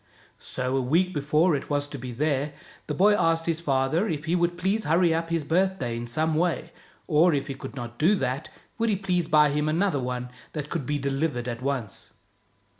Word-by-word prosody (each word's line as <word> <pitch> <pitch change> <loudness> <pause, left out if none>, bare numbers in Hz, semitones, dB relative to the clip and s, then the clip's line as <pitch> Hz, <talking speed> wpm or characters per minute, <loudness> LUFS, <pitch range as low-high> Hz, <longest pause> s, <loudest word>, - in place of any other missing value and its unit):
So 130 +1 -3
a 135 - +2
week 170 +9 +2
before 150 +3 +2
it 140 - -5
was 145 -1 0
to 145 - -7
be 125 +1 -6
there', 145 +2 -1 0.3
the 150 - -2
boy 205 +6 +5
asked 165 -4 +2
his 165 -1 0
father 150 +5 +1
if 155 -4 -3
he 165 +2 +1
would 175 0 +1
please 195 +4 0
hurry 165 +1 +3
up 165 +1 -1
his 165 -2 0
birthday 170 -6 0
in 120 +1 -5
some 155 +6 0
way, 165 0 0 0.3
or, 165 0 +4
if 140 -1 -1
he 140 - -4
could 135 - -9
not 120 -2 -7
do 180 +7 +4
that, 130 -4 -2 0.3
would 230 0 +2
he 210 - +2
please 180 -4 0
buy 150 -2 +5
him 150 +1 0
another 165 -1 +1
one 125 -1 -3 0.2
that 150 -1 -5
could 160 -7 -3
be 145 - 0
delivered 140 -2 -1
at 120 0 -4
once. 130 -6 -4
150 Hz, 210 wpm, -26 LUFS, 135-170 Hz, 0.3 s, boy